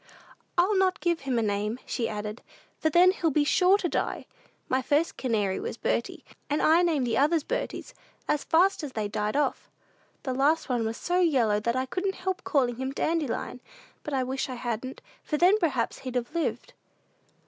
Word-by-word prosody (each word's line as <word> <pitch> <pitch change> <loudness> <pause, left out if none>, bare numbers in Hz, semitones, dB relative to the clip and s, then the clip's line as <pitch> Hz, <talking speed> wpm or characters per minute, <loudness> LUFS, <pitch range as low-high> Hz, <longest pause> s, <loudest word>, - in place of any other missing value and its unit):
"I'll 370 +4 +3
not 375 -1 +2
give 340 -2 0
him 265 -3 -2
a 230 - +2
name," 210 +2 -1
she 235 - -2
added, 210 +1 -5 0.4
"for 315 - +2
then 355 +4 +6
he'll 345 -4 0
be 300 0 +2
sure 365 +6 +4
to 370 - -1
die! - - -2 0.4
My 260 +1 +1
first 295 +5 +1
canary 210 -7 0
was - - -5
Bertie, 235 - -2 0.2
and 295 +1 +1
I 325 +3 +5
named 315 -7 +1
the 230 0 +1
others 305 +2 +3
Berties, - - -4 0.3
as 295 - 0
fast 365 +4 +3
as 280 -3 -5
they 215 -2 -2
died 210 +1 -2
off. 290 - -1 0.5
The 260 - -2
last 285 +4 +2
one 240 -3 0
was 225 - -4
so 355 +1 0
yellow 250 -12 +3
that 235 +3 -1
I 260 0 0
couldn't 385 +8 -2
help 370 0 -3
calling 250 -5 +1
him 265 +1 -3
Dandelion; 295 -5 -2 0.4
but 295 - -4
I 260 - +1
wish 265 +1 -3
I 255 - -4
hadn't, 240 +1 -5 0.2
for 300 - -2
then, 370 +6 +5
perhaps, 265 - 0
he'd 255 -1 -7
have 245 +4 -2
lived." 335 -1 -2
275 Hz, 190 wpm, -27 LUFS, 235-335 Hz, 0.5 s, then